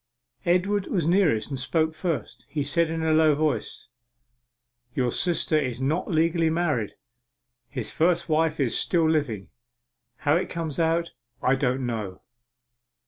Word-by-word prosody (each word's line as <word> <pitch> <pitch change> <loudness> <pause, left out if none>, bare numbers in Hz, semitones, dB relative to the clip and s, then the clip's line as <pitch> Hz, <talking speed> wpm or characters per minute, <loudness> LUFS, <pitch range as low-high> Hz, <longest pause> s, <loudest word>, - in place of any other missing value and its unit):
Edward 190 +3 +2
was 170 -6 0
nearest, 165 - +2
and 135 - -2
spoke 155 +5 0
first. 160 0 -4
He 150 -2 -1
said 170 +2 +1
in 165 0 -2
a 160 - +2
low 155 -1 +5
voice: 155 -1 -1 1.1
'Your 125 -2 +1
sister 165 -1 +1
is 130 -4 -3
not 150 +7 -1
legally 165 0 +2
married! 155 -10 -1 0.7
His 125 -4 -5
first 170 +1 +2
wife 160 0 +1
is 130 -5 +1
still 165 -2 +2
living! 140 -11 -1 0.7
How 150 +1 +2
it 180 - -2
comes 165 -3 -4
out 165 +1 +1 0.3
I 130 - +4
don't 130 -1 0
know! 105 -6 -4
155 Hz, 140 wpm, -25 LUFS, 135-170 Hz, 1.1 s, low